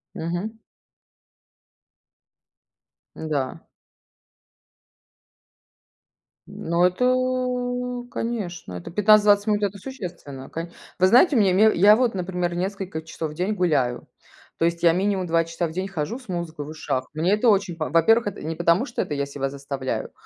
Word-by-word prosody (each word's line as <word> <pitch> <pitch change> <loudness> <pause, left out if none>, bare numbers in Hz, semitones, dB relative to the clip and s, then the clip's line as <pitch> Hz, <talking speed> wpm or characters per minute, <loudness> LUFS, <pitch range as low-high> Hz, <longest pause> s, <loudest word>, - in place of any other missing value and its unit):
Мгм. 175 +7 -4 2.6
Да. 145 -5 -3 2.9
Ну, 170 +1 -1
это, 250 +3 0
конечно, 195 - -4
это 90 - -7
15-20 210 +1 +5
минут- 210 -1 +1
это 200 0 -1
существенно. 175 - -8
Ко 165 +1 -6 0.3
вы 185 - +4
знаете, 255 - +5
у - - +4
меня 205 +2 +5
я 205 +3 +6
вот, 240 -2 +1
например, 180 -1 -2
несколько 185 -2 -3
часов 160 -1 -6
в - - -9
день 185 +6 -1
гуляю, 145 -11 0 0.5
то 165 - +1
есть 170 0 -1
я 170 - +7
минимум 190 +1 0
2 165 0 +2
часа 165 +1 -3
в - - -8
день 185 +3 -3
хожу 195 +4 -4
с 255 - -18
музыкой 170 -5 -4
в - - -9
ушах. 140 -4 -3
Мне 165 +5 +1
это 215 +3 +3
очень 195 -4 +2
по 155 - -3
во-первых, 225 +8 +4
это 205 - -5
не 160 +1 -4
потому, 170 +7 +2
что 240 - -3
это - - -3
я 140 -1 -1
себя 140 -1 -4
заставляю, 140 -1 -4
180 Hz, 145 wpm, -24 LUFS, 160-215 Hz, 2.9 s, я